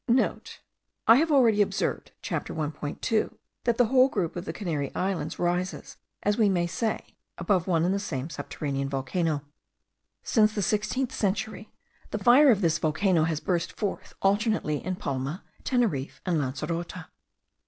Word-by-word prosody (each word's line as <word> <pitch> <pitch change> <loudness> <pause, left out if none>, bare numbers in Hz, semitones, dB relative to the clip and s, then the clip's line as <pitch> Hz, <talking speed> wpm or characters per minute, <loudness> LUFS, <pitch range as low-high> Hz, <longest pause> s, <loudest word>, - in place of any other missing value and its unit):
(I 230 - +9
have 320 +3 +2
already 235 -7 +5
observed 200 0 -1
(Chapter - - -3
1.2) 155 +7 -2 0.3
that 235 -1 +2
the 245 - +5
whole 255 +3 +5
group 185 -10 -2
of 175 +1 -5
the - - -3
Canary 155 -8 -3
Islands 180 -5 -2
rises, 175 +1 -2 0.3
as 205 +2 +1
we 215 -2 +5
may 175 -3 +1
say, 220 +6 -3 0.2
above 190 -5 +1
one 165 -2 +2
and 185 - +2
the 200 - 0
same 140 -9 -3
submarine 140 -2 -3
volcano. 145 +3 -1 0.8
Since 215 -3 +3
the 205 - 0
sixteenth 215 +6 0
century, 215 +2 -2 0.4
the - - -2
fire 265 +4 +6
of 215 -5 +4
this 170 -2 +2
volcano 160 +1 +2
has 160 -2 -1
burst 175 -1 -1
forth 205 -3 -4
alternately 200 -6 +1
in 185 0 -2
Palma, 140 +2 -3 0.2
Teneriffe, 215 - 0
and 175 -4 +1
Lancerote. 165 +6 -3
185 Hz, 150 wpm, -27 LUFS, 155-215 Hz, 0.8 s, I